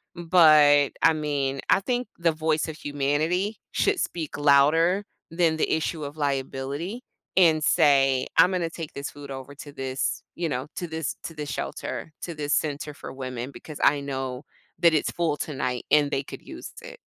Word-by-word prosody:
but, 155 -5 +6
I 165 - +6
mean, 140 -3 -1
I - - +5
think 245 +2 -1
the 170 -1 +2
voice 155 0 0
of 160 - -6
humanity 155 +8 -1
should 405 -3 +1
speak 160 -4 -3
louder 155 +7 +4 0.3
than 165 -1 +1
the - - 0
issue 160 0 -1
of 145 +2 -7
liability 140 - -3 0.3
and 160 -4 +5
say, 135 -6 +4 0.2
"Im 180 - +2
gonna 170 -2 -1
take 165 -3 -7
this 140 - -5
food 145 -1 -11
over 135 +1 -7
to 145 0 -10
this, 135 -2 -3
you 170 -2 -2
know, 130 0 -2
to 175 - -3
this 160 -2 -3
to 165 - -6
this 150 -1 -5
shelter, 160 - -5
to 170 - -4
this 145 -1 -2
center 150 -1 -1
for - - -9
women 130 -1 -5
because 155 0 -10
I 145 - +5
know 130 -1 -4 0.3
that 170 -2 +5
it's 150 - 0
full 165 -4 -1
tonight 125 -4 -3
and 150 -1 +5
they 135 - 0
could - - -9
use - - -9
it." - - -11
150 Hz, 180 wpm, -25 LUFS, 140-165 Hz, 0.3 s, but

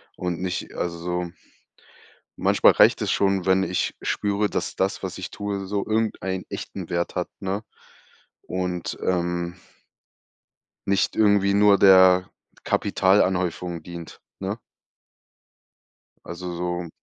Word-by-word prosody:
und 90 -2 -3
nicht 90 0 -4
also 90 +1 -3 1.1
manchmal - - +5
reicht - - +5
es - - -1
schon, 95 -2 +1
wenn 95 0 +4
ich 90 -1 -1
spüre, 105 0 0
dass - - -3
das, 95 +1 -1
was 95 -2 -5
ich 95 - -6
tue, 100 -1 -4
so 100 +1 -2
irgendeinen 110 -4 -1
echten - - -6
Wert 85 0 -1
hat, 90 - -2
ne? 95 +2 -2 0.8
Und, 90 -1 -3
ähm, 85 -1 -1 1.3
nicht 100 -1 +1
irgendwie 100 -2 +4
nur 100 0 +5
der 95 -1 +6 0.3
Kapitalanhäufung 90 -3 +1
dient, 85 -1 -9 0.2
ne? 100 +3 -3 1.7
Also 90 0 -6
so 90 0 -3
95 Hz, 115 wpm, -24 LUFS, 90-100 Hz, 1.7 s, der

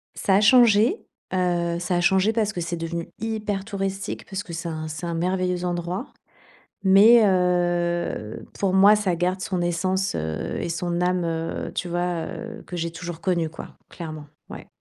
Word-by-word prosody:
Ça 190 - +2
a 205 - +4
changé. 235 - +5 0.4
Heu, 175 -2 0
ça 180 0 -1
a 175 - +2
changé 190 +5 +3
parce 215 -2 +1
que 180 - -5
c'est 170 +1 -3
devenu 165 0 -4
hyper 210 -3 -2
touristique, 195 -1 -4
parce 195 +1 -5
que 175 - -11
c'est 170 +1 -4
un 155 -1 -4
c'est 155 +3 -6
un 170 - -2
merveilleux 180 +1 -1
endroit. 175 +6 -3 0.8
Mais 215 +5 +7
heu, 175 - 0 0.2
pour 195 -2 +1
moi, 200 +2 +7
ça 195 -4 0
garde 180 +2 -1
son 185 -3 -2
essence, 185 +3 0
heu 80 0 -3
et - - -3
son 170 +1 -2
âme, 180 0 +1
heu, 165 0 -3
tu 180 - -2
vois, 175 -1 -1
heu, 225 -1 -8
que 180 - -7
j'ai 165 0 -2
toujours 170 -1 -7
connues, 170 -4 0
quoi, 160 - -10
clairement. 155 -3 -7 0.2
Ouais. - - -9
180 Hz, 180 wpm, -24 LUFS, 170-195 Hz, 0.8 s, Mais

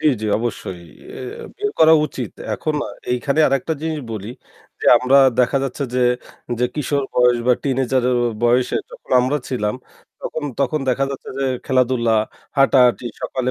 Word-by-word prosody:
জি, - - 0
জি 110 - -2
অবশ্যই, 110 -6 -4 0.3
এ - - -8 0.2
এ - - -8
বের 415 +1 -1
করা 160 0 +7
উচিত। - - -6 0.2
এখন 155 - -2
আ - - -7 0.2
এইখানে 140 +5 0
আরেকটা 135 +4 0
জিনিস 160 -1 -2
বলি 105 -1 -6 0.5
যে, - - -3
আমরা 125 +2 +3 0.2
দেখা 125 +2 +2
যাচ্ছে 130 +1 -4
যে, 125 - +1 0.6
যে 125 - +2
কিশোর 145 -1 -1
বয়স 125 -1 +4
বা 125 - +5
টিনেজার 130 -2 0 0.4
বয়সে 120 +1 +2
যখন - - -14
আমরা 130 +4 +1
ছিলাম 105 -5 -1 0.5
তখন 155 - -4 0.2
তখন 150 +3 +1
দেখা 130 +2 +2
যাচ্ছে 135 - -7
যে 135 - 0 0.2
খেলাধুলা, 125 -3 +2 0.4
হাঁটাহাটি, 125 -3 +4 0.2
সকালে 130 -1 -2
130 Hz, 160 wpm, -20 LUFS, 120-140 Hz, 0.6 s, করা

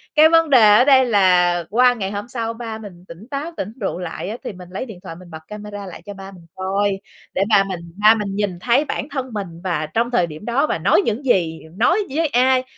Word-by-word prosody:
cái 310 +1 +7
vấn 330 -1 +4
đề 215 -6 +7
ở 245 - +6
đây 265 -2 +6
là 180 -5 +3
qua 245 +3 +4
ngày 195 -5 -4
hôm 205 +2 -5
sau 230 -2 -4
ba 225 -1 -6
mình 190 -5 -12
tỉnh 175 +7 -12
táo, 290 +4 -4
tỉnh 200 - -4
rượu 190 -3 -2
lại 180 +1 -5
á, 220 - -5
thì - - -5
mình 180 -1 -12
lấy 190 +7 -5
điện 220 -8 -11
thoại 165 - -8
mình 175 0 -14
bật 160 - -8
camera 210 -1 -8
lại 185 - -10
cho 205 - -7
ba 195 0 -10
mình 180 -3 -15
coi, 195 +1 -1 0.4
để 195 - +2
ba 200 -3 +5
mình 185 -2 -4 0.2
ba 215 +1 +8
mình 205 -3 -4
nhìn 200 -4 -2
thấy 250 +9 +2
bản 280 - -4
thân 260 -3 -4
mình 205 -2 -3 0.2
và 170 -5 -1
trong 235 +2 +1
thời 180 -8 +2
điểm 155 +4 -10
đó 260 +6 +1
và - - -1
nói - - +3
những 230 +5 -2
gì, 170 -9 +1 0.2
nói 345 - +3 0.2
với 325 +1 +2
ai, 255 -1 +3
210 Hz, 250 wpm, -20 LUFS, 185-245 Hz, 0.4 s, ba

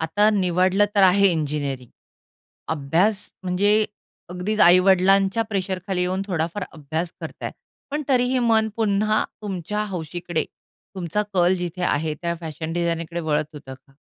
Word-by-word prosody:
आता 205 +7 +2
निवडलं 185 0 +2
तर 200 - +4
आहे 195 +1 +6
इंजिनिअरिंग, 145 -5 -3 0.8
अभ्यास 165 +8 0
म्हणजे 190 +3 +2 0.6
अगदीच 195 +4 -2
आई-वडिलांच्या 190 +4 +5
प्रेशर 190 -2 -2
खाली 190 -2 -1
येऊन 185 +2 -1
थोडाफार 180 +1 -2
अभ्यास 160 +3 -4
करताय. - - -6 0.4
पण 300 +1 -2
तरीही 255 0 +2
मन 225 -2 +3
पुन्हा 215 -1 +1 0.2
तुमच्या 210 +2 -3
हौशीकडे 175 -2 -3 0.5
तुमचा 185 +2 -1
कल 180 +1 +4
जिथे 180 +1 -4
आहे 155 -2 0
त्या 170 0 -1
फॅशन 160 0 -5
डिझायनकडे 170 0 -2
वळत 155 -2 0
होतं 135 -2 -9
का? 130 +1 -23
180 Hz, 130 wpm, -23 LUFS, 160-200 Hz, 0.8 s, आहे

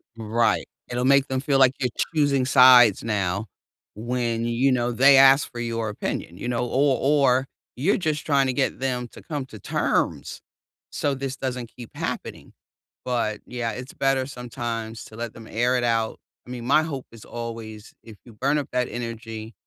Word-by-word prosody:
Right. 115 -1 0 0.2
It'll 125 +1 -1
make 140 0 +4
them 130 0 -1
feel 140 -1 +1
like 130 -1 +6
you're 125 -2 0 0.3
choosing 140 -4 +2
sides 125 -5 +7
now 100 -1 -1 0.5
when, 115 +1 -2
you 120 +3 +2
know, 120 -1 +1
they 135 +3 +6
ask 135 +1 +6
for 120 - -7
your 115 -1 -2
opinion, 90 -4 -5
you 120 - -5
know, 125 0 -1
or 135 +2 +2
or 135 -2 +3 0.3
you're 155 +11 +1
just 155 -5 -2
trying 140 -3 +2
to 130 - 0
get 135 +1 -1
them 125 -2 -2
to - - -13
come 145 -5 -5
to 110 - -11
terms, - - -1 0.5
so 145 - -1
this 135 0 -4
doesn't 125 -3 -4
keep 120 -2 -10
happening, - - -5 0.5
but 115 -4 -1
yeah, 120 -2 -3
it's 125 +4 -8
better 135 -1 +1
sometimes 120 -3 -5
to 110 - -13
let 115 -1 -5
them 115 - -12
air 125 +3 +1
it 125 - -1
out. 115 -2 0 0.3
I - - -12
mean, 120 -2 -6
my 140 +4 +4
hope 140 -5 -5
is 115 -2 -13
always 115 -2 -8
if 110 -1 -12
you 120 - -14
burn 135 +7 0
up 145 - -3
that 125 -1 0
energy, 115 -1 -6
125 Hz, 185 wpm, -24 LUFS, 115-135 Hz, 0.5 s, sides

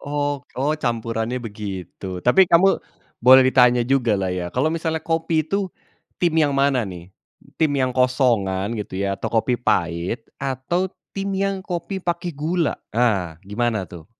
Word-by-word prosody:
Oh 145 -1 -2 0.2
oh, 140 +4 +1
campurannya 115 0 -2
begitu. 95 -4 -6
Tapi, 180 +9 +5
kamu 185 +3 +4 0.4
boleh 130 +2 +8
ditanya 125 -2 +4
jugalah 115 -8 +1
ya, 90 -1 -3
kalau 140 - 0
misalnya 160 -1 -2
kopi 165 -1 0
itu, 195 +3 -1 0.5
tim 175 -2 +1
yang 145 -2 +2
mana 135 -6 +2
nih? 90 +1 -10 0.5
Tim 155 -2 +3
yang 130 -1 +1
kosongan 115 -6 +1
gitu 95 - -6
ya, 100 0 -1
atau - - -3
kopi 120 +2 0
pahit, 85 +3 -1 0.2
atau 140 +8 -1 0.2
tim 195 0 -3
yang 195 0 -1
kopi 185 +2 -4
pakai 175 -1 -2
gula, 160 +3 -1 0.2
ah, 100 -9 +1
gimana 110 0 -1
tuh? 85 -2 -11
125 Hz, 150 wpm, -22 LUFS, 105-160 Hz, 0.5 s, boleh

